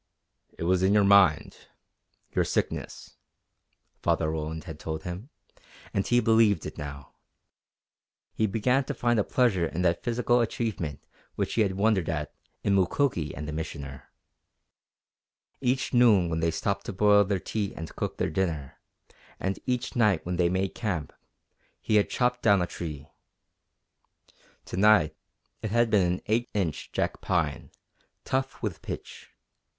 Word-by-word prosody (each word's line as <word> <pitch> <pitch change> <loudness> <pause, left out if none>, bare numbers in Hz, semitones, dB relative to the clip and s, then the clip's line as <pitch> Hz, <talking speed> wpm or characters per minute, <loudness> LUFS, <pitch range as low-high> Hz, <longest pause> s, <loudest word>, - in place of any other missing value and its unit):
"It - - -5
was 90 +1 +2
in 95 +2 +3
your 105 - +5
mind 100 -5 +4 0.7
your - - +2
sickness," - - -3 0.8
Father 80 -1 +1
Roland 80 0 -4
had 80 -3 -9
told 80 0 -5
him, 90 +9 -6 0.6
and 100 - 0
he 120 - +4
believed 110 -6 +3
it - - -6
now. 70 -1 -8 1.2
He 110 - +1
began 125 +6 +1
to - - -4
find 120 -2 +1
a - - +3
pleasure 100 -10 +2
in 90 +3 -3
that 85 -1 +2
physical 120 0 +2
achievement 105 - -3 0.3
which - - -2
he 115 - +2
had 100 -3 +2
wondered 100 -3 +1
at 75 -3 -3 0.3
in 100 - +2
Mukoki 95 - +1
and 75 +2 -6
the - - -4
Missioner. 75 -3 -6 1.5
Each 130 -1 0
noon 110 -8 +5
when 80 - -1
they 85 0 +1
stopped 100 +4 -2
to - - -3
boil 105 +1 +5
their 100 0 0
tea 100 +2 -3
and 80 0 -8
cook - - -3
their - - -1
dinner, 75 -6 -2 0.6
and 95 +1 -2
each 125 -1 -1
night 105 -8 +2
when 90 0 -2
they 85 -1 +3
made 95 +1 -1
camp, 95 -10 -3 0.7
he 110 - +2
had 105 - +2
chopped 125 0 0
down 100 -4 +5
a 90 - +1
tree. 75 -4 -7 1.6
To - - -6
night 105 -6 +5 0.5
it 110 - -3
had 120 +1 +2
been 90 -4 +3
an 90 - -5
8 120 +3 0
inch 90 -7 -2
jack - - -2
pine, - - -1 0.6
tough 135 -1 -2
with 105 -5 -3
pitch. - - -8
95 Hz, 155 wpm, -27 LUFS, 80-110 Hz, 1.6 s, your